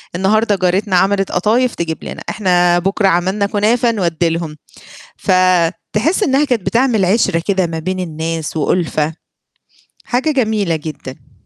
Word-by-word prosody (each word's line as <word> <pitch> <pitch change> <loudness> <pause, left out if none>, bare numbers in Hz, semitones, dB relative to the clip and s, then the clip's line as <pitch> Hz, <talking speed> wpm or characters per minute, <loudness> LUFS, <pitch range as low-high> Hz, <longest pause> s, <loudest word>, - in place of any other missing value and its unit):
النهاردة 210 +3 +2
جارتنا 185 +1 0
عملت 195 +1 +2
قطايف 225 +7 +1
تجيب 165 -1 -4
لنا، - - -7
إحنا 175 -3 +2
بكرة 195 +2 0
عملنا 190 +3 +1
كنافة 225 +4 +1
نودّي 170 -5 0
لهم، 165 -2 -4 0.6
فتحس 185 - +1
إنّها 275 -1 +2
كانت 235 -9 -1
بتعمل 230 -1 +2
عِشرة 180 -4 +1
كده 190 -3 +1
ما 165 -1 -5
بين 185 +3 -3
الناس 160 -1 -4
وأُلفَة، 155 -1 0 0.9
حاجة 260 +6 0
جميلة 215 - 0
جدًا. 140 -4 -9
185 Hz, 130 wpm, -16 LUFS, 170-215 Hz, 0.9 s, النهاردة